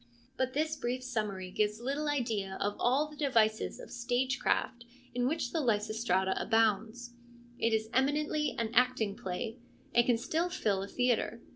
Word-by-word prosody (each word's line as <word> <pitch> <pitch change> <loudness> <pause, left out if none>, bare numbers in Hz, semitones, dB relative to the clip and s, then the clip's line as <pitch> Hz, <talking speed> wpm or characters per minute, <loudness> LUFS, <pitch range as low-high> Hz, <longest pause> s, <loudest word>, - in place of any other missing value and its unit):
But 260 0 -1
this 310 +2 0
brief 255 -2 -3
summary 210 -7 -3
gives 210 +2 0
little 280 +5 -2
idea 220 -9 -1
of 205 0 -1
all 265 +5 +3
the 300 - -12
devices 230 -7 +1
of - - -10
stage 245 +2 0
craft 240 -2 0 0.3
in 245 0 +1
which 285 -4 -1
the 325 - 0
Lysistrata 210 -5 +1
abounds. 225 +2 +1 0.5
It 230 - +2
is 220 0 +1
eminently 300 +3 +1
an 230 -2 -1
acting 245 -4 +2
play, 205 +6 -4 0.3
and 240 - +6
can 240 -1 +3
still 325 +9 -1
fill 205 - 0
a 195 - -4
theatre. 245 0 0
240 Hz, 160 wpm, -32 LUFS, 215-260 Hz, 0.5 s, and